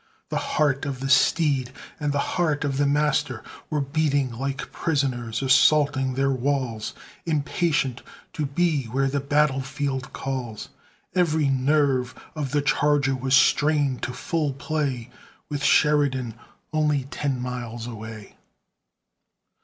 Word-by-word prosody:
The - - -1 0.2
heart 145 -3 +2
of 135 -3 -4
the 135 +1 -3
steed 135 -1 +3 0.3
and 150 -1 0
the 145 - -1 0.2
heart 155 -5 +1
of 135 -2 -1
the 145 - +3
master 145 -4 +1 0.3
Were 150 -1 0
beating 140 -2 0
like 135 +3 -4
prisoners 130 -6 -1
assaulting 135 0 +4
their 135 +1 +2
walls, 130 -4 -2 0.3
Impatient 145 -4 0 0.3
to 155 -5 -2
be 150 -1 +1
where 135 +4 0
the 140 +1 0
battle 140 -1 +2
field 135 -1 -3
calls; 125 -5 -5 0.4
Every 160 -5 +2
nerve 135 -1 +1 0.2
of 150 -4 -3
the 145 +1 0
charger 145 -1 +2
was 130 +1 +2
strained 145 -2 +3
to 125 - -2
full 150 +2 -2
play, 140 -4 -3 0.4
With 145 -1 -3
Sheridan 140 -7 +3 0.4
only 150 -3 +2
ten 140 -3 -2
miles 120 -2 -5
away. 110 -2 -9
140 Hz, 130 wpm, -24 LUFS, 130-150 Hz, 0.4 s, assaulting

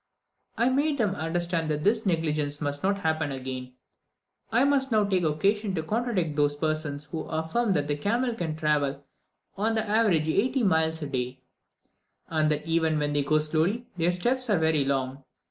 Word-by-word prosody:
I 235 +3 +3
made 285 +3 +1
them 210 -6 +1
understand 170 -1 -1
that 150 0 -1
this 215 +2 +2
negligence 150 -4 0
must 145 -1 -2
not 200 +1 0
happen 160 -3 0
again. 130 -1 -6 0.8
I 235 +3 +4
must 275 -2 +2
now 215 -1 +4
take 190 -3 +1
occasion 195 +6 0
to 160 - -2
contradict 210 -6 -1
those 145 -1 +2
persons 155 -1 -2
who 155 +2 -5
affirm 165 +8 0
that 145 -4 0
the 145 - 0
camel 235 - 0
can 165 -8 -3
travel 145 -3 0 0.5
on 220 +3 +1
the 220 0 0
average 205 -8 +2
eighty 250 - +1
miles 160 -4 +2
daily, 130 -2 -4 0.9
and 155 -1 +1
that 150 0 -1
even 160 -1 +1
when 145 -1 -1
they 145 - +2
go 155 +2 +2
slowly, 160 +10 0
their 170 0 +2
steps 245 +8 0
are 205 - +3
very 160 -2 +2
long. 135 0 -2
160 Hz, 175 wpm, -27 LUFS, 150-210 Hz, 0.9 s, I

